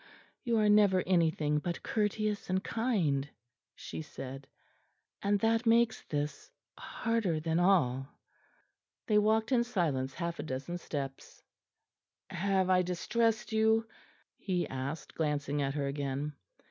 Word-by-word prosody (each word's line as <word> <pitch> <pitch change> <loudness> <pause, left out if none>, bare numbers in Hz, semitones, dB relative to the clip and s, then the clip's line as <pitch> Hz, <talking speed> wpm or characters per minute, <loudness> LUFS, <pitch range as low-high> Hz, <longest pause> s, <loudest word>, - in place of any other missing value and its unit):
"You 235 -3 +1
are 215 -1 +3
never 205 -3 +5
anything 160 -4 +2
but 170 +3 -4
courteous 210 -1 -1
and 190 +1 0
kind," 170 - 0 0.5
she - - -7
said, 135 -2 -8 0.7
"and 200 0 +2
that 225 +1 +2
makes 230 0 +4
this 150 - -3 0.3
harder 225 -8 -1
than 160 +1 0
all." 135 -9 +3 1.0
They 210 -1 +4
walked 220 +3 +2
in 240 -2 +4
silence 150 - -1
half 170 -1 -3
a - - -2
dozen 140 +5 -4
steps. 135 -5 -6 0.9
"Have 190 0 +1
I 185 -1 +4
distressed 225 +6 0
you?" 220 +1 +3 0.5
he 180 -3 -1
asked, 135 +3 -5
glancing 145 -2 -1
at 135 0 -1
her 145 -2 -1
again. 140 +1 -3
175 Hz, 125 wpm, -31 LUFS, 145-215 Hz, 1.0 s, never